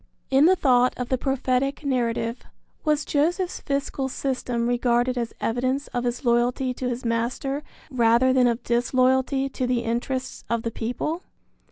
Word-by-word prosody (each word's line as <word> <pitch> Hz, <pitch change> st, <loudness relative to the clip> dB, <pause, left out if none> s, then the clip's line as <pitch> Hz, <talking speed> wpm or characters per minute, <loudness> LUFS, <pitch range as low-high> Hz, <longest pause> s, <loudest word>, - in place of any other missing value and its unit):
In 270 Hz, +3 st, +6 dB
the 375 Hz, -, +5 dB
thought 250 Hz, -6 st, +3 dB
of 250 Hz, -1 st, -4 dB
the 260 Hz, -, +1 dB
prophetic 270 Hz, +1 st, 0 dB
narrative, 235 Hz, -3 st, 0 dB, 0.4 s
was 300 Hz, -1 st, +1 dB
Joseph's 350 Hz, +5 st, 0 dB
fiscal 275 Hz, -1 st, -2 dB
system 250 Hz, -3 st, -2 dB
regarded 245 Hz, +1 st, +1 dB
as 235 Hz, -2 st, -2 dB
evidence 255 Hz, +4 st, -1 dB
of 245 Hz, 0 st, -2 dB
his 245 Hz, +3 st, -2 dB
loyalty 245 Hz, +2 st, +2 dB
to 250 Hz, 0 st, -3 dB
his 245 Hz, 0 st, -4 dB
master 240 Hz, +5 st, -1 dB, 0.3 s
rather 240 Hz, +1 st, +4 dB
than 255 Hz, -1 st, +4 dB
of 235 Hz, 0 st, -1 dB
disloyalty 255 Hz, +3 st, +2 dB
to 255 Hz, -1 st, -2 dB
the 245 Hz, -1 st, +1 dB
interests 245 Hz, +3 st, -3 dB
of 230 Hz, -1 st, 0 dB
the 230 Hz, -, -2 dB
people? 250 Hz, +10 st, -3 dB
255 Hz, 155 wpm, -24 LUFS, 240-270 Hz, 0.4 s, In